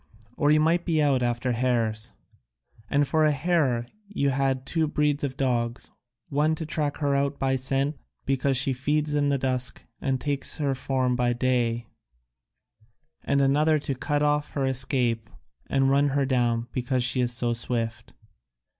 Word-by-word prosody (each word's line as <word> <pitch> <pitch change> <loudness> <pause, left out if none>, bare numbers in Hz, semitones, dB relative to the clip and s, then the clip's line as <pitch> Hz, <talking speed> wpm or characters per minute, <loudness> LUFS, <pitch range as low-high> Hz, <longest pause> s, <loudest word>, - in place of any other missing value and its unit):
Or 145 - +1
you 155 +1 +5
might 165 +3 +2
be 165 -3 0
out 140 -4 +2
after 120 +1 0
hares, 115 -2 -1 0.8
and 145 0 +2
for 160 +1 +2
a 155 - +4
hare 140 -5 +1 0.2
you 140 -9 0
had 135 -1 0
two 160 +2 0
breeds 150 -1 0
of 135 -2 -3
dogs, 120 -3 -1 0.4
one 150 +3 +1
to 160 - -5
track 150 -2 -2
her 145 -2 0
out 140 0 0
by 135 0 0
scent, 135 +3 +1 0.3
because 135 0 +1
she 135 +1 +1
feeds 150 +4 -1
in 145 -1 +2
the 140 - +2
dusk 130 -1 -1 0.2
and 135 -1 0
takes 145 -1 0
to 150 - -3
her 140 -1 +1
form 130 -1 0
by 120 0 +1
day, 120 -2 0 1.4
and 140 0 +1
another 150 +3 +3
to 145 -1 -3
cut 145 +3 -1
off 150 0 0
her 140 -2 0
escape 125 -4 -1 0.4
and 135 0 +2
run 140 +1 +3
her 140 0 +1
down, 120 -3 0
because 125 0 -1
she 125 0 +2
is 120 -1 +1
so 120 -1 0
swift. 115 -1 -3
135 Hz, 170 wpm, -26 LUFS, 125-145 Hz, 1.4 s, you